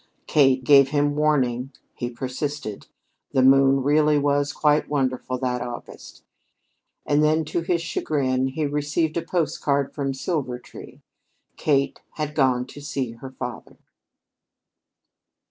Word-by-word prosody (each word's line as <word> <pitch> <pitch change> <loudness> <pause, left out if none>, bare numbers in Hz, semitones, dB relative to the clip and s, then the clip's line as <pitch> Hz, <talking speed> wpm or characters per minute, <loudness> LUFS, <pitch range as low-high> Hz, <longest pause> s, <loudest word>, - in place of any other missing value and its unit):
Kate 135 -3 +3
gave 140 0 +6
him 145 0 +1
warning; 135 -4 +1 0.2
he 120 - -4
persisted, 130 -1 -5 0.5
the 130 - +3
moon 135 0 +5
really 150 +1 +3
was 145 0 +1
quite 150 0 +1
wonderful 130 -3 -1
that 125 -1 -2
August, 120 -1 -9 0.8
and 150 +1 +2
then, 155 +1 +2
to 155 +3 -2
his 170 0 -1
chagrin, 130 -5 0
he 150 +4 -2
received 150 +2 -1
a 170 - 0
postcard 150 -5 -1
from 140 -2 -2
Silvertree. 130 -3 -5 0.5
Kate 140 -2 0
had 150 -1 -4
gone 130 -4 +2
to 145 +2 -12
see 140 -4 -3
her 115 +3 -10
father. 125 -2 -8
140 Hz, 125 wpm, -23 LUFS, 130-150 Hz, 0.8 s, gave